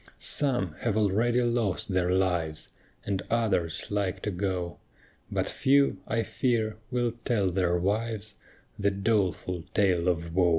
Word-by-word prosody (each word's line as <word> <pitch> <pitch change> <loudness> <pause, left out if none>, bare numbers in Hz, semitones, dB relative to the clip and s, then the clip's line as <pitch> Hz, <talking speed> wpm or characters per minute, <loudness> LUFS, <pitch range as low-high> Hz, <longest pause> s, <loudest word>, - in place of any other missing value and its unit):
Some 125 - +2
have 110 -3 0
already 115 +4 +2
lost 115 -5 0
their 95 -2 +1
lives, 90 -4 0 0.4
And 100 -2 -1
others 95 -10 0
like 100 -3 -1
to 105 - -1
go; 90 -2 -2 0.5
But - - 0
few, 140 -7 +3
I 115 0 0
fear, 110 -4 0
will 120 -2 0
tell 115 -5 0
their 90 -1 +1
wives 105 +3 -1 0.5
The 100 0 +3
doleful 95 -4 0
tale 90 -4 +3
of 85 -2 -1
wo. 90 -1 +4
100 Hz, 135 wpm, -28 LUFS, 90-115 Hz, 0.5 s, wo